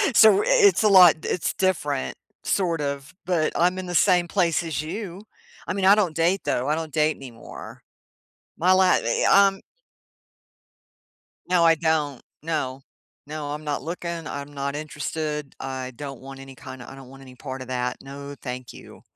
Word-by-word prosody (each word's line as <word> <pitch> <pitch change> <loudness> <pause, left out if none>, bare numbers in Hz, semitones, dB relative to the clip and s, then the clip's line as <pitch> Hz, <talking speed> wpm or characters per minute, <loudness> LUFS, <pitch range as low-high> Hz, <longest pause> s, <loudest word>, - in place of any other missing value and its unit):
So, 220 - +7
i - - -3
it's 435 - +5
a 215 - +5
lot 180 -4 +8
it's 180 - -1
different, 150 -8 -1 0.3
sort 170 -5 0
of, 140 -1 -4
but 170 -4 +1
I'm 180 +2 +2
in 185 - -4
the 175 - -4
same 175 0 +4
place 175 -2 +1
as 155 -4 -3
you. 185 +3 -6 0.4
I - - -1
mean, 195 0 -1
I 195 - +8
don't 185 -7 0
date, 170 +4 +2
though, 125 - 0
I - - +3
don't 160 -1 -5
date 155 0 +2
anymore. 120 -4 -11 0.7
My 180 +3 +3
la 190 0 +5
i 115 -10 +2
i 200 0 +7
um 195 0 -4 1.9
No, 180 -2 +4
I 165 -1 +6
don't, 155 -5 0 0.2
no, 135 -5 -3 0.4
no, 150 -1 -5
I'm 150 +1 -5
not 150 -1 -2
looking, 170 0 -5
I'm 140 0 -6
not 140 0 -3
interested, 150 -1 -4
I 130 -1 -5
don't 140 -1 -8
want 135 0 -10
any 135 0 -11
kinda 125 0 -10
I 135 - -11
don't 135 -2 -13
want 135 0 -14
any 130 -1 -13
part 130 0 -7
of 130 - -8
that, 125 0 -2
no, 140 +1 -9
thank 125 -1 -6
you. - - -14
155 Hz, 180 wpm, -24 LUFS, 135-180 Hz, 1.9 s, lot